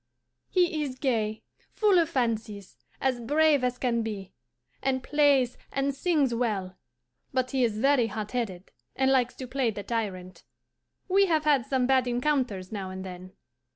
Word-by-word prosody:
He 355 -4 +2
is 265 -3 -4
gay, 220 -5 -1 0.3
full 410 -4 +4
of 330 - +1
fancies, 220 -5 -2 0.2
as 260 -2 0
brave 295 +3 +3
as 250 0 0
can 240 -2 0
be, 205 -4 -5 0.5
and 260 -1 0
plays 280 -4 +3
and 275 +1 0
sings 280 -3 +1
well, 205 -6 -1 0.6
but 255 -1 -1
he 265 -2 +1
is 220 -3 0
very 265 0 +3
hot 210 0 -5
headed, 200 -7 -4 0.2
and 265 0 +2
likes 250 -2 +2
to 260 - -6
play 255 -1 0
the 205 -2 -5
tyrant. 185 -5 -4 0.6
We 390 +1 +4
have 300 -6 +2
some 260 -2 +1
bad 260 -1 +3
encounters 245 -7 -1
now 195 -3 -4
and 190 0 -7
then. 185 0 -9
250 Hz, 155 wpm, -27 LUFS, 215-275 Hz, 0.6 s, full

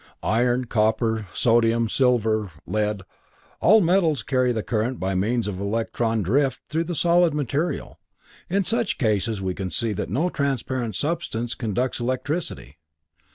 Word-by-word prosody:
Iron, 120 +2 +1
copper, 110 -1 +1
sodium, 115 0 +2
silver, 110 -4 +1 0.2
lead 105 0 -1 0.6
all 215 +4 +6
metals 165 - +2
carry 130 +1 +1
the 110 -3 -2
current 120 +2 -1
by 95 +1 -1
means 110 +6 0
of 95 -3 -4
electron 110 +1 -1
drift 130 - +1
through 160 +2 0
the 175 0 -4
solid 170 -1 +3
material. 150 +4 -2 0.5
In 195 +3 +1
such 225 +1 +1
cases 110 -3 0
we 95 -1 -1
can 95 0 -4
see 115 +3 -1
that 95 - -4
no 155 - 0
transparent 130 -5 -2
substance 120 - -2
conducts 125 +3 -2
electricity. 130 - -3
120 Hz, 140 wpm, -24 LUFS, 110-145 Hz, 0.6 s, all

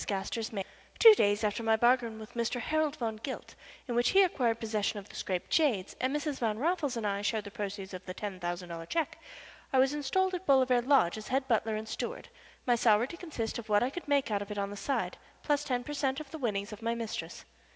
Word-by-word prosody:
GASTER'S 210 +3 -2
MAID 195 -3 -3 0.3
Two 450 -2 +10
days 205 - +2
after 210 +1 0
my 225 -1 +3
bargain 240 -1 +3
with 220 -1 -10
Mr. 235 +1 -1
Harold 310 +2 0
Van 225 -5 -3
Gilt, 260 +5 -6 0.3
in 245 - -2
which 240 +1 +3
he 390 0 +6
acquired 240 -10 +1
possession 215 -2 -1
of 200 0 -8
the - - -13
Scrappe 185 -2 -2
jades 240 - +1
and 255 +1 +1
Mrs. 295 -2 -2
Van 220 -3 0
Raffles 300 -2 0
and 225 - -3
I 200 0 0
shared 215 +1 0
the 205 - -9
proceeds 200 -2 -5
of 185 0 -7
the 185 - -4
ten 200 -3 -5
thousand 175 0 -4
dollars 165 -1 -6
check, 330 -4 -1 0.5
I 265 - +2
was 265 +2 +4
installed 370 +7 +1
at 365 +1 -4
Bolivar 260 -3 +5
Lodge 240 -8 +3
as 215 - -9
head 265 +1 0
butler 225 -2 +1
and 215 +1 -4
steward, 220 - -5 0.4
my 245 - +4
salary 230 +1 +4
to 340 - -8
consist 245 -12 -4
of 220 - -10
what 205 +1 +4
I 255 - 0
could 350 +2 -7
make 280 -5 +2
out 200 -1 +1
of 205 - -6
it 210 - -5
on 200 0 -2
the - - -6
side, 205 +8 -2 0.2
plus 290 -1 +1
ten 250 -4 -1
per 295 - -6
cent. 275 -1 0
of 300 -3 -9
the 320 - -6
winnings 205 -5 -2
of 210 - -10
my 230 +1 0
mistress. 230 -2 -5
230 Hz, 245 wpm, -31 LUFS, 210-275 Hz, 0.5 s, Two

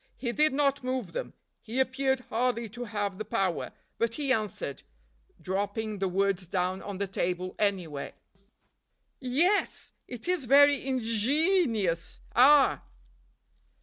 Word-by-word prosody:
He 240 - -2
did 305 +5 +3
not 280 0 +1
move 255 0 -3
them; - - -5 0.3
he 230 +4 -4
appeared 265 0 +1
hardly 235 0 0
to 240 +4 -7
have 205 -3 -3
the - - -2
power, 195 -4 -1 0.3
but 230 0 0
he 280 -3 +1
answered, 210 - -3 0.6
dropping 205 +4 -3
the 195 - 0
words 195 0 0
down 185 +1 -1
on 200 -1 -6
the 200 - -1
table 185 -1 -2
anywhere. 180 -9 -2 1.1
"Ye 255 +4 +1
yes! 400 +3 0 0.2
it 245 +5 -8
is 360 -7 0
very 285 +3 +6
inge 260 -2 -2 0.2
nious, 270 - +1 0.2
ah!" 275 +3 +6
230 Hz, 135 wpm, -28 LUFS, 195-270 Hz, 1.1 s, very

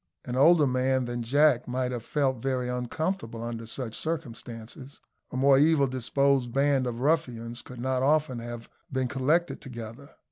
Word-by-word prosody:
An 125 - -4
older 155 +3 +6
man 130 0 +1
than 120 0 -3
Jack 135 +1 +3
might 125 0 -1
have 120 -2 -4
felt 135 -4 0
very 130 -1 -1
uncomfortable 125 - -3
under 115 -1 -5
such 115 -1 -4
circumstances. 130 -4 -6 0.3
A - - -5
more 135 0 +5
evil 150 -1 +4
disposed 130 0 +1
band 135 0 +2
of 120 0 -4
ruffians 120 -6 -1
could 125 -1 -11
not 130 +1 0
often 145 -2 +2
have 120 0 -7 0.2
been 130 -1 0
collected 145 +7 0
together. 120 +2 -9
130 Hz, 155 wpm, -27 LUFS, 120-140 Hz, 0.3 s, older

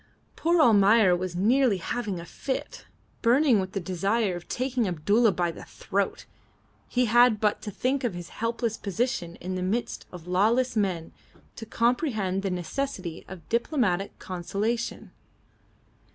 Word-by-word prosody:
Poor 340 +1 +2
Almayer 210 - +6
was 180 0 -4
nearly 230 +3 +3
having 200 +1 -3
a 170 - -8
fit. 265 +9 -5 0.4
Burning 245 -1 +4
with 185 0 -4
the 195 - -1
desire 195 +3 0
of 175 - -9
taking 250 -3 -1
Abdulla 205 +7 +3
by 175 -2 0
the - - -11
throat, 200 0 -3 0.6
he 250 0 +1
had 240 -1 +5
but 210 -1 +1
to - - -5
think 260 +7 -1
of 230 -7 -1
his 175 -1 -7
helpless 230 0 -2
position 200 -4 -2
in 185 +2 -6
the 185 - -3
midst 210 +6 -2
of 175 -3 -10
lawless 225 +8 +2
men 185 -6 -1 0.4
to 225 - -8
comprehend 230 - 0
the 195 - -2
necessity 180 0 -4
of 185 -3 -11
diplomatic 230 - 0
conciliation. 200 +6 -3
210 Hz, 145 wpm, -27 LUFS, 185-240 Hz, 0.6 s, Almayer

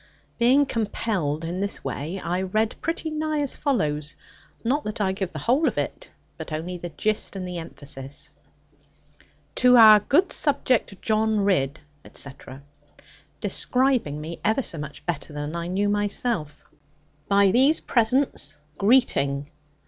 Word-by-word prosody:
Being 260 +5 +5
compelled 200 - -2
in 175 +3 -3
this 200 +1 -2
way, 165 +7 -4
I 180 +1 -2
read 215 +4 0
pretty 330 -1 -2
nigh 310 -1 -1
as 285 - -2
follows; 150 - -1 0.5
not 275 +6 0
that 210 - -4
I 195 -2 +1
give 190 -2 -3
the - - -7
whole 250 - +2
of - - -1
it, - - -3 0.3
but - - -7
only 170 +3 -4
the 175 - -6
gist 215 +4 -2
and 185 -1 -4
the 180 -1 -4
emphasis, 145 -4 -9 1.2
'To 250 +5 +5
our 215 -2 +9
good 305 - +2
subject, 255 - +1
John 220 -1 +1
Ridd, 155 -8 +1 0.2
etc.' 135 0 -8 0.8
describing 250 - 0
me 160 +2 -7
ever 220 +5 +2
so 165 - -6
much 150 -1 -8
better 160 -3 -3
than 145 +2 -4
I 170 0 -3
knew 195 +3 0
myself 205 -6 -1 0.6
'by 200 -1 +4
these 270 +8 +4
presents, 255 +4 0 0.2
greeting. 150 - +2
200 Hz, 140 wpm, -24 LUFS, 160-245 Hz, 1.2 s, our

